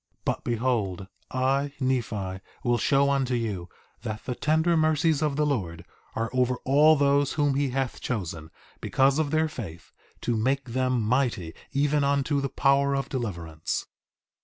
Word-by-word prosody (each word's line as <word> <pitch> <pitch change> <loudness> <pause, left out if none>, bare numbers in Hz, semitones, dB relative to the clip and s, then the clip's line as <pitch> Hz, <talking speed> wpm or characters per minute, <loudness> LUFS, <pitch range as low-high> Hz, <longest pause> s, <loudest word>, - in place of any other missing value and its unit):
But - - -1
behold, 115 -6 -1 0.2
I, 135 +2 0
Nephi, 110 -8 -1 0.2
will 120 -2 +2
show 140 +3 +3
unto 135 -2 +1
you 100 -7 -3 0.3
that 110 -2 -5
the 125 - -2
tender 160 +5 +2
mercies 155 -1 +2
of 150 -2 +1
the 150 +1 +2
Lord 90 - -2 0.3
are 115 0 -2
over 125 0 +2
all 150 +4 +6
those 140 -1 +2
whom 145 -2 +2
he 140 0 +1
hath 130 0 -2
chosen, 85 -9 -4 0.3
because 135 +2 +2
of 155 -2 +1
their 155 +2 +2
faith, 100 - -8 0.3
to 120 - 0
make 130 +4 0
them 130 -1 +1
mighty 115 -8 0 0.2
even 145 +1 +2
unto 140 0 +1
the 140 - -2
power 140 +1 +2
of 135 - -2
deliverance. 85 - -3
130 Hz, 155 wpm, -26 LUFS, 115-140 Hz, 0.3 s, all